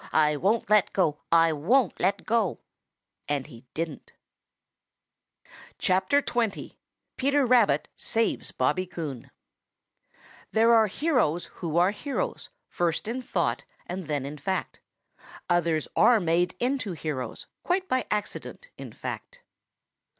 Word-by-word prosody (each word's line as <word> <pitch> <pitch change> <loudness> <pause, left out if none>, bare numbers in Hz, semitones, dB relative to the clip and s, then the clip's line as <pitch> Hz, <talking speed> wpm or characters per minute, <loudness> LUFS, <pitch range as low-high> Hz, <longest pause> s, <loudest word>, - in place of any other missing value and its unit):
I 150 -1 +3
won't 205 +9 +1
let 210 -2 +3
go. 155 -6 +1
I 165 -1 +5
won't 200 - +2
let 195 +2 0
go." 220 -5 +1 0.7
And 145 -2 0
he 125 -3 -14
didn't. 160 -2 -5 1.6
XX. 225 +3 +1 0.4
PETER 280 +1 +2
RABBIT 240 -3 +4
SAVES 225 0 -1
BOBBY 185 0 +1
COON 155 -8 -6 1.2
There 230 +1 +5
are 220 -1 +6
heroes 215 - +1 0.2
who 165 -2 -1
are 180 +3 +5
heroes 285 - -4 0.2
First 175 +3 -1
in 245 +3 -3
thought 135 - -1 0.2
and 180 0 -5
then 145 -3 -1
in 145 +1 -7
fact. 190 +6 -3 0.7
Others 170 -3 +1
are 240 -2 +6
made 175 +1 +1
into 250 -6 -1
heroes; 145 -7 -5 0.2
Quite 370 +1 0
by 255 - 0
accident, 210 - -4
in - - -8
fact. - - -7
185 Hz, 120 wpm, -27 LUFS, 160-235 Hz, 1.6 s, are